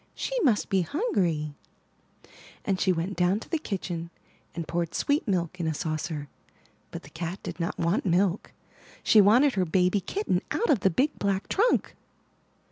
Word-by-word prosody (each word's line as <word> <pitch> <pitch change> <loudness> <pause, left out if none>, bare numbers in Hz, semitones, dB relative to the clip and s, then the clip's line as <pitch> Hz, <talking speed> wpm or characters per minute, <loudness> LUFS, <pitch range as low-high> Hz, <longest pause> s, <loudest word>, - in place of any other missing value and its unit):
she - - -4
must 240 - +2
be 190 -1 +3
hungry," 175 - -1 1.1
and 195 -2 0
she 190 - +3
went 180 +3 -2
down 180 +3 +2
to - - -11
the 325 - -1
kitchen 175 - -4 0.5
and 165 -2 -4
poured 170 0 -2
sweet 285 -2 +1
milk 185 -2 -1
in 165 - -1
a 160 - -1
saucer, 155 -2 -3 0.6
but - - -8
the - - -13
cat 170 +3 -4
did - - -6
not 170 +1 -2
want 170 +5 +1
milk. 185 +1 +1 0.5
She 215 - +6
wanted 245 +8 +5
her 190 - +1
baby 180 +3 +2
kitten 405 - -1
out 470 - +1
of 255 - +3
the 190 - +3
big 265 - 0
black 195 -1 0
trunk! 455 +5 +2
185 Hz, 170 wpm, -27 LUFS, 170-215 Hz, 1.1 s, She